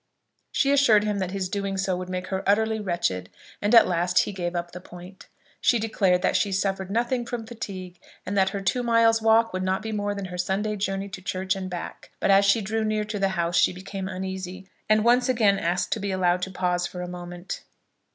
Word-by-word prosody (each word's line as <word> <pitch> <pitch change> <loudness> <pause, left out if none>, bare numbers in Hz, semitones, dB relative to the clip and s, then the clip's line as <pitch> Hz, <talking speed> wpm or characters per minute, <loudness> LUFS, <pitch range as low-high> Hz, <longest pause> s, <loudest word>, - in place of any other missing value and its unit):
She 275 - +2
assured 245 -7 +5
him 210 -1 -1
that 185 -2 -1
his 190 -1 -2
doing 195 0 -3
so 190 -1 0
would 180 0 -5
make 185 0 -4
her 190 -1 -1
utterly 220 +2 +2
wretched, 170 - -2 0.3
and 205 +3 +3
at 230 - +8
last 180 0 0
he 205 - -3
gave 175 -2 -3
up 175 0 -3
the 180 - -9
point. 180 +1 -12 0.3
She 240 - +4
declared 195 -5 +1
that - - +2
she 200 - +2
suffered 195 -1 -1
nothing 240 +3 0
from 235 -1 -5
fatigue, 185 -6 -7 0.3
and 200 - -3
that 190 -1 +3
her 200 0 -4
two 195 +6 0
miles' 230 -1 +3
walk 225 0 +4
would 185 - -2
not 190 +2 -1
be 220 - -4
more 205 -1 -2
than 200 -1 -4
her 180 -1 -7
Sunday 200 +4 -1
journey 195 -1 -2
to 190 -1 -8
church 185 0 -1
and 190 -1 -5
back. 175 -1 -7
But - - +2
as 195 +1 +6
she 200 +3 +4
drew 220 +2 -1
near 215 0 0
to 210 0 -4
the 195 0 +2
house 170 0 +1
she - - +4
became 190 +1 -6
uneasy, 190 0 -5 0.2
and 215 0 +4
once 245 +2 +4
asked 195 -7 +2
to 220 - 0
be 200 0 -3
allowed 180 -1 +1
to 190 - -2
pause 180 -1 -1
for 180 -1 -6
a - - -5
moment. 175 0 -7
195 Hz, 225 wpm, -25 LUFS, 180-215 Hz, 0.3 s, at